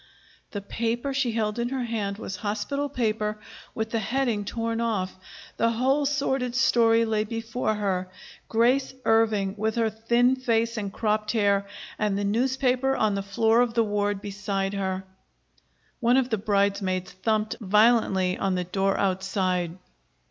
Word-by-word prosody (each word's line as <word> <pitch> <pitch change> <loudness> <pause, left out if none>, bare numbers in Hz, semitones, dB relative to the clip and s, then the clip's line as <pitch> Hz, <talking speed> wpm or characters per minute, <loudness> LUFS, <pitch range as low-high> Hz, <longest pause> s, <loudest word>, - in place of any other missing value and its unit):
The 205 - -5
paper 235 +6 -2
she 265 -4 0
held 215 0 -1
in 240 0 -1
her 260 -1 -2
hand 210 -4 -2
was 190 -3 -6
hospital 215 +8 -2
paper 215 -4 -1 0.4
with 220 0 -3
the 230 - 0
heading 225 -1 -1
torn 230 +1 -2
off. 210 -5 -1 0.4
The 230 - +3
whole 270 +5 +2
sordid 265 -3 -1
story 230 -3 +4
lay 215 -1 +1
before 225 +1 -2
her: 190 -3 -1 0.4
Grace 255 +4 +2
Irving, 215 -3 +2
with 220 +1 -1
her 225 -2 +1
thin 235 +4 +2
face 230 -2 0
and 205 -3 -3
cropped 215 +1 -1
hair, 200 -3 +2 0.3
and 210 -2 +1
the 205 - -1
newspaper 255 +4 +1
on 215 -2 +1
the 200 - -1
floor 225 +4 +2
of 240 -2 0
the 230 - +4
ward 205 -1 -1
beside 200 -1 -2
her! 190 -1 -2 1.0
One 245 +1 +3
of 260 -1 +1
the 220 - +2
bridesmaids 200 -3 0
thumped 215 +2 -1
violently 205 -3 +3
on 190 -1 0
the 180 - -1
door 195 +2 0
outside. 185 -2 0
220 Hz, 155 wpm, -26 LUFS, 200-235 Hz, 1.0 s, story